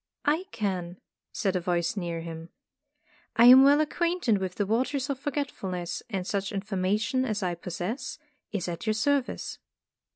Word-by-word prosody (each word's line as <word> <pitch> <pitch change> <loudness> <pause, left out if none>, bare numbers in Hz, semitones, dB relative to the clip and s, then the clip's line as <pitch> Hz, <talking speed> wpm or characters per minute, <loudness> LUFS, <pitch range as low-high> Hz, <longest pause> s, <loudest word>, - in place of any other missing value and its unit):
"I 315 +6 +2
can," 185 -5 -3 0.3
said 195 -1 -1
a - - +2
voice 175 0 0
near 170 -4 -3
him. 165 0 -7 0.9
"I 230 - +6
am 255 +2 +10
well 285 +2 +6
acquainted 320 - +1
with 185 -1 -3
the 205 - 0
Waters 260 +6 0
of 270 - -4
Forget 285 0 -2
fulness 180 -2 -4
and 190 -4 -2
such 195 0 -2
information 205 +5 0
as 215 -5 -2
I 180 -1 0
possess 180 - -4 0.3
is 195 -5 -2
at 170 +4 -5
your 215 - +2
service." 280 +3 0
205 Hz, 160 wpm, -28 LUFS, 180-260 Hz, 0.9 s, am